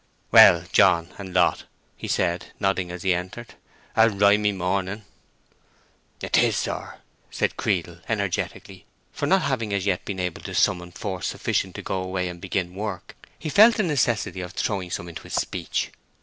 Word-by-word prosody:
"Well, -, -, +8 dB
John, 85 Hz, 0 st, +4 dB
and 95 Hz, -2 st, -7 dB
Lot," 90 Hz, -1 st, +2 dB, 0.3 s
he -, -, -7 dB
said, 85 Hz, +1 st, -1 dB
nodding 95 Hz, -2 st, 0 dB
as 90 Hz, 0 st, -7 dB
he 95 Hz, -1 st, +3 dB
entered. 95 Hz, +7 st, -6 dB, 0.4 s
"A 110 Hz, +1 st, +6 dB
rimy 105 Hz, 0 st, +3 dB
morning." 95 Hz, +2 st, -2 dB, 1.1 s
"'Tis, -, -, +2 dB
sir!" -, -, -4 dB, 0.3 s
said -, -, -1 dB
Creedle, 85 Hz, -3 st, -2 dB
energetically; 100 Hz, -4 st, -3 dB, 0.2 s
for, -, -, -3 dB
not 190 Hz, 0 st, +3 dB
having 120 Hz, -6 st, -1 dB
as 95 Hz, -1 st, -2 dB
yet 95 Hz, -3 st, 0 dB
been 95 Hz, -2 st, -5 dB
able 90 Hz, -2 st, -3 dB
to -, -, -7 dB
summon 90 Hz, -1 st, +1 dB
force 95 Hz, 0 st, -4 dB
sufficient -, -, -2 dB
to -, -, -7 dB
go 95 Hz, -, -2 dB
away 95 Hz, -1 st, -2 dB
and 85 Hz, -1 st, -9 dB
begin 90 Hz, -1 st, -2 dB
work, 100 Hz, -2 st, -6 dB, 0.2 s
he -, -, -7 dB
felt 215 Hz, +9 st, +6 dB
the 215 Hz, -, +1 dB
necessity 125 Hz, -, 0 dB
of 90 Hz, -1 st, -7 dB
throwing 95 Hz, -4 st, -2 dB
some 85 Hz, -, -4 dB
into 85 Hz, -1 st, -8 dB
his -, -, -7 dB
speech. 85 Hz, -3 st, -2 dB
95 Hz, 165 wpm, -24 LUFS, 90-105 Hz, 1.1 s, Well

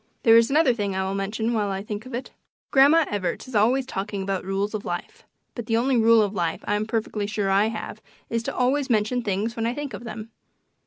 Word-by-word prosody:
There 225 Hz, -1 st, +7 dB
is 230 Hz, 0 st, +5 dB
another 290 Hz, -2 st, +4 dB
thing 205 Hz, -4 st, -2 dB
I 190 Hz, -, 0 dB
will 190 Hz, +1 st, -2 dB
mention 215 Hz, +4 st, -2 dB
while 210 Hz, -3 st, 0 dB
I 195 Hz, 0 st, -3 dB
think 210 Hz, +3 st, -6 dB
of 255 Hz, -, -10 dB
it. 250 Hz, -, -6 dB, 0.4 s
Grandma 290 Hz, +4 st, +6 dB
Evarts 195 Hz, 0 st, -3 dB
is 260 Hz, -, -11 dB
always 240 Hz, +5 st, +3 dB
talking 200 Hz, -4 st, -4 dB
about 195 Hz, -1 st, -2 dB
"rules 195 Hz, +3 st, -2 dB
of 215 Hz, -1 st, -3 dB
life," 175 Hz, 0 st, -6 dB, 0.3 s
but 235 Hz, -3 st, -7 dB
the 225 Hz, -1 st, +2 dB
only 255 Hz, +3 st, +2 dB
rule 230 Hz, -1 st, +5 dB
of 205 Hz, -1 st, -2 dB
life 175 Hz, -4 st, -2 dB
I'm 210 Hz, +1 st, -1 dB
perfectly 220 Hz, -2 st, -2 dB
sure 205 Hz, -2 st, -1 dB
I 200 Hz, +2 st, +4 dB
have 220 Hz, -1 st, -6 dB, 0.3 s
is 230 Hz, 0 st, -1 dB
to -, -, -4 dB
always 265 Hz, +2 st, +1 dB
mention 225 Hz, +2 st, +1 dB
things 215 Hz, +1 st, -2 dB
when 230 Hz, 0 st, -1 dB
I 240 Hz, -, -2 dB
think 290 Hz, -4 st, -5 dB
of 205 Hz, -, -7 dB
them. 225 Hz, -1 st, -8 dB
220 Hz, 230 wpm, -24 LUFS, 200-240 Hz, 0.4 s, There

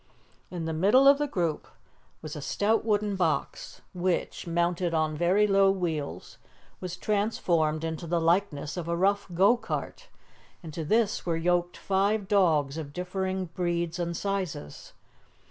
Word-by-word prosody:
In 175 Hz, -3 st, -5 dB
the 160 Hz, -, -2 dB
middle 205 Hz, +12 st, +5 dB
of 280 Hz, +1 st, +7 dB
the 295 Hz, -, 0 dB
group 170 Hz, -, -2 dB, 0.6 s
was 155 Hz, -2 st, -6 dB
a 150 Hz, -, -6 dB
stout 205 Hz, +10 st, +1 dB
wooden 210 Hz, -2 st, 0 dB
box, 175 Hz, -5 st, -2 dB
which, 180 Hz, -1 st, -2 dB
mounted 170 Hz, 0 st, 0 dB
on 155 Hz, -1 st, 0 dB
very 180 Hz, +6 st, +3 dB
low 195 Hz, -1 st, +4 dB
wheels, 170 Hz, -6 st, -3 dB, 0.4 s
was 180 Hz, -1 st, -6 dB
transformed 170 Hz, -7 st, 0 dB
into 165 Hz, +1 st, -4 dB
the 170 Hz, +1 st, +1 dB
likeness 165 Hz, -3 st, 0 dB
of 170 Hz, -2 st, -4 dB
a 170 Hz, 0 st, -1 dB
rough 200 Hz, +3 st, +1 dB
go 195 Hz, +7 st, +5 dB
cart, 240 Hz, -, -5 dB, 0.6 s
and 160 Hz, -2 st, -8 dB
to 165 Hz, -, -4 dB
this 220 Hz, +6 st, +1 dB
were 165 Hz, -2 st, -1 dB
yoked 175 Hz, +1 st, 0 dB
five 200 Hz, +1 st, 0 dB
dogs 160 Hz, -7 st, +2 dB
of 145 Hz, -2 st, -7 dB
differing 185 Hz, +1 st, -3 dB
breeds 170 Hz, -1 st, -2 dB
and 170 Hz, -1 st, -2 dB
sizes. 185 Hz, -, -4 dB
175 Hz, 150 wpm, -27 LUFS, 165-195 Hz, 0.6 s, of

